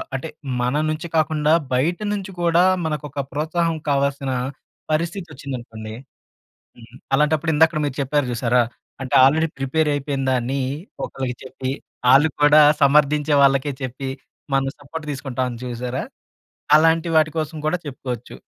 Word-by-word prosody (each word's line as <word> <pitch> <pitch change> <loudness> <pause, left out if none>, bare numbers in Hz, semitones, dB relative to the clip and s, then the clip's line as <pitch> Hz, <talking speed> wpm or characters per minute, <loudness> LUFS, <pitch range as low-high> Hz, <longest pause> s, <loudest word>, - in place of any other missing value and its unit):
అంటే 135 +5 -4 0.3
మన 125 +3 0
నుంచి 155 +2 -3
కాకుండా 155 -1 +2 0.2
బయట 155 +8 +1 0.2
నుంచి 195 -1 -4
కూడా 170 0 +4 0.2
మనకొక 150 -2 -3
ప్రోత్సాహం 160 +3 -1
కావాల్సిన 140 -1 0 0.6
పరిస్థితి 170 +4 -1
వచ్చిందనుకోండి. 120 -5 -7 0.8
హ్మ్, 120 +1 -16 0.2
అలాంటప్పుడు 150 +2 +2
ఇందాక 160 0 +3
మీరు 140 - -4
చెప్పారు 145 +1 0
చూశారా, 120 +1 +2 0.4
అంటే 135 +1 -3
ఆల్‌రెడీ 160 +4 +3
ప్రిపేర్ 150 +3 +1
అయిపోయిందాన్ని 135 -2 -1 0.4
ఒకళ్ళకి 130 -2 -4
చెప్పి 130 0 -4 0.4
ఆళ్ళు 145 +4 +6 0.2
కూడా 150 +1 +7 0.2
సమర్థించే 150 +1 +4
వాళ్ళకే 135 +1 +3
చెప్పి, 130 +1 -4 0.5
మనం 135 0 +2
సపోర్ట్ 150 +2 -8
తీసుకుంటాం 130 -3 -3
చూశారా! 125 +1 -4 0.7
అలాంటి 165 +1 +3
వాటి 155 0 +4
కోసం 155 0 -3
కూడా 180 +4 +1
చెప్పుకోవచ్చు. 125 -3 -6
140 Hz, 125 wpm, -21 LUFS, 130-155 Hz, 0.8 s, కూడా